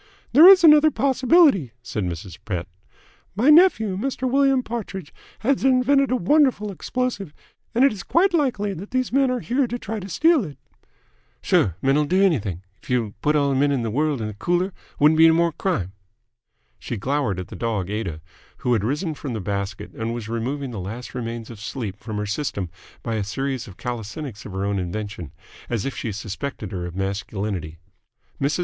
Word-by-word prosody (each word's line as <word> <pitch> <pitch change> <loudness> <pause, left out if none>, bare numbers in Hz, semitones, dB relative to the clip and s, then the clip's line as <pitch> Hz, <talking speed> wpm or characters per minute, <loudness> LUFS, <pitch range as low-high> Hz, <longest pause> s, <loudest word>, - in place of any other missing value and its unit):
"There 310 +7 +9
is 380 -2 +9
another 305 -1 +8
possibility," 265 - +3
said 105 -4 -3
Mrs. 85 0 -6
Pett. 90 -5 -3 0.7
"My 245 +9 +4
nephew, 300 - +5
Mr. 260 +2 -2
William 270 0 +3
Partridge, 200 -9 -6 0.3
had 265 +3 +1
invented 270 +1 +3
a 255 - +2
wonderful 250 - +2
explosive, 205 - -3 0.4
and 250 +3 +5
it 275 - +3
is 200 - -7
quite 365 +3 +2
likely 245 - 0
that 190 +3 -8
these 255 -1 -1
men 270 -1 +3
are 250 -1 -1
here 255 +2 0
to 240 - -3
try 220 -2 -5
to 195 0 -8
steal 315 - +3
it." 150 -6 -8 0.9
"Sure. 90 - +2
Men'll 140 +3 +3
do 185 +5 +1
anything. 110 - +1 0.2
If - - -17
y' 120 -5 0
put 150 +1 +2
all 140 -1 +2
the - - 0
men 140 +2 +2
in 130 -4 0
th' 115 - -2
world 145 -2 0
in 105 -1 -4
th' 105 - -22
cooler, 175 +2 0 0.3
wouldn't 155 +2 +5
be 165 - +9
'ny 160 - +5
more 170 0 +2
crime." 115 - -2 0.9
She 120 - -5
glowered 125 -4 -1
at 90 - -7
the - - -8
dog 105 -5 -2
Aida, 95 -8 -4 0.4
who 125 - +3
had 110 -4 +1
risen 150 - -1
from 140 -3 -6
the 110 - -3
basket 100 +1 -4
and 115 +1 -3
removing 125 +4 -3
the 110 - -5
last 110 +7 -7
remains 115 -2 -5
of 115 - -11
sleep 105 -2 -5
from 110 0 -6
her 105 - -2
system 100 - -3 0.3
by 115 -2 -2
a 105 - -1
series 135 +5 -3
of 95 -2 -12
calisthenics 120 0 -6
of 100 - -9
her 95 +1 -2
own 100 -1 0
invention, 90 -4 -5 0.4
as 115 -4 -2
if 135 - -3
she 115 - -3
suspected 105 +2 -5
her 90 -2 -4
of 85 - -9
masculinity. 95 -3 -3 0.6
Mrs. 145 +4 +1
140 Hz, 195 wpm, -23 LUFS, -, 0.9 s, There